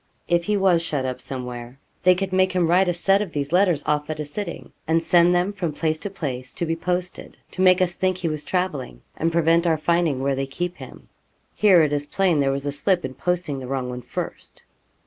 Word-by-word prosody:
If 170 0 +1
he 210 +1 +1
was 185 -4 +3
shut 145 -5 -2
up 130 -1 -4
somewhere 125 -1 -7 0.2
they 185 0 +5
could 190 0 -3
make 185 0 +3
him 180 -2 +2
write 180 +2 +3
a - - +1
set 195 +3 +3
of 195 -5 -5
these 145 0 -3
letters 180 -3 +3
off 150 0 0
at 155 -1 -4
a 150 - -3
sitting, 170 +4 -6 0.2
and 165 +1 +2
send 175 +1 +5
them 180 +3 +1
from 175 -6 -3
place 155 +1 -1
to 205 - -4
place 130 -9 -5
to 170 - -2
be 165 0 -1
posted, 180 +2 -4
to 185 - -4
make 185 0 +5
us 175 -1 0
think 185 0 0
he 180 - -2
was 155 -2 -3
travelling, 150 - -3
and 165 +1 0
prevent 165 +1 +3
our 160 -1 +3
finding 160 -4 +1
where 140 0 +1
they 135 0 -2
keep 175 +6 -4
him. - - -12 0.5
Here 190 -6 +5
it 150 -1 0
is 145 0 -1
plain 180 -1 +1
there 140 -1 +2
was 140 +1 -3
a 145 - -1
slip 175 +4 0
in 130 - -5
posting 175 -3 -2
the 130 - -7
wrong 130 -1 -2
one 125 0 -6
first.' - - -7
165 Hz, 235 wpm, -23 LUFS, 145-180 Hz, 0.5 s, they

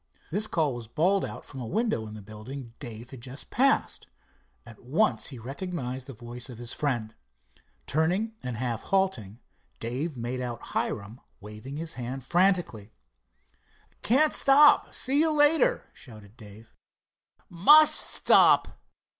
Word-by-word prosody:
This 210 +5 +1
call 155 -8 0
was 120 -2 -8
bawled 185 - +1
out - - -7
from 135 -2 -9
a 120 - -6
window 210 - -1
in 105 - -9
the 105 - -10
building 115 +4 -10
Dave 120 +1 -9
had 130 -3 -10
just 130 +2 -10
passed. 275 +2 +1 0.6
At 115 -2 -14
once 155 - 0
he 130 - -9
recognized 130 0 -6
the 135 - -8
voice 120 +2 -8
of 120 - -10
his 120 0 -5
friend. 120 -7 -2 0.7
Turning 180 +9 0
and 125 -3 -5
half 120 -2 -3
halting, 130 - -1 0.4
Dave 130 +6 -4
made 120 +2 -4
out 120 -2 -6
Hiram 105 +4 -3 0.2
waving 105 +7 -9
his 165 +1 -6
hand 130 +2 -6
frantically. 175 - 0 1.1
"Can't 290 +7 +2
stop—see 280 -1 +4
you 320 0 +3
later," 320 +12 +3
shouted 110 -4 -14
Dave. 110 -1 -15 0.7
"Must 295 - +6
stop." - - +4
130 Hz, 140 wpm, -27 LUFS, 115-185 Hz, 1.1 s, Must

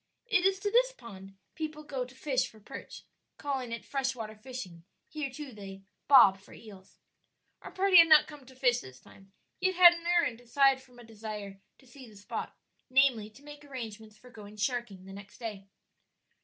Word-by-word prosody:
It 405 -6 +1
is 390 0 0
to 410 - -1
this - - +4
pond 195 - -12 0.2
people 310 -1 -6
go 270 -4 -4
to 250 +1 -16
fish 265 -2 -1
for 220 - -18
perch; 205 - -10 0.3
calling 265 -4 -4
it 230 -1 -6
fresh 265 -1 -2
water 220 -3 -7
fishing; 215 -7 -9 0.2
here 300 -3 -4
too 280 +1 -9
they 195 -3 -10 0.2
"bob" 200 -9 +7
for 195 - -17
eels. 200 -4 -15 0.6
Our - - -9
party 380 -1 +4
had 335 -1 +9
not 310 -1 +7
come 295 -4 -13
to 260 - -15
fish 245 -2 +2
this 130 - -12
time, 195 +7 -19 0.3
yet 375 0 +1
had 350 -1 +9
an 340 0 -8
errand 340 -10 +1
aside 270 +2 +3
from 250 -2 -20
a 240 - -13
desire 210 -3 -8 0.2
to 265 - -22
see 255 -1 -14
the 215 - -17
spot 200 0 -7 0.3
namely, 255 -5 +3
to 220 +6 -19
make 295 0 -12
arrangements 220 -6 -9
for 250 +3 -17
going 210 -2 -12
sharking 210 -4 -3
the 195 - -11
next 200 0 -12
day. 210 -5 -7
250 Hz, 195 wpm, -30 LUFS, 210-290 Hz, 0.6 s, had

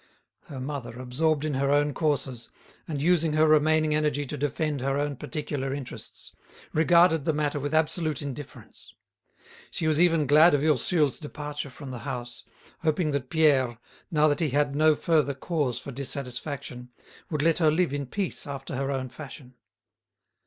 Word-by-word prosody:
Her 140 -3 -8
mother, 130 -3 -5
absorbed 145 +4 0
in 155 - -1
her 135 +1 0
own 145 0 +2
courses, 135 -7 -1 0.4
and 150 -3 -3
using 165 0 +2
her 155 +1 +4
remaining 155 0 +4
energy 150 -1 0
to - - -5
defend 145 0 -2
her 135 +1 0
own 145 0 -1
particular 140 -2 -4
interests, 135 -3 -8 0.4
regarded 165 0 +4
the 160 - +2
matter 145 -1 -1
with 145 +1 -3
absolute 155 -1 +1
indifference. 145 -1 -9 0.7
She 160 - -4
was 155 0 +2
even 165 -4 +4
glad 150 +4 +6
of 145 - 0
Ursule's 150 0 +2
departure 150 -1 -6
from 135 +1 -9
the 125 - -6
house, 120 0 -6 0.4
hoping 155 0 0
that 140 -2 -3
Pierre, 135 -7 +3 0.3
now 155 -3 +3
that 145 -1 +1
he 160 - +1
had 140 +1 +1
no 155 +1 +4
further 150 -4 +1
cause 140 -4 -1
for 135 +3 -7
dissatisfaction, 130 -1 -6 0.4
would 150 -4 -1
let 165 +1 +3
her 160 -3 +5
live 160 -1 +1
in 140 -2 -3
peace 190 +1 -3
after 135 -1 -6
her 135 0 -1
own 135 -2 -2
fashion. 130 -1 -11
145 Hz, 165 wpm, -27 LUFS, 135-155 Hz, 0.7 s, glad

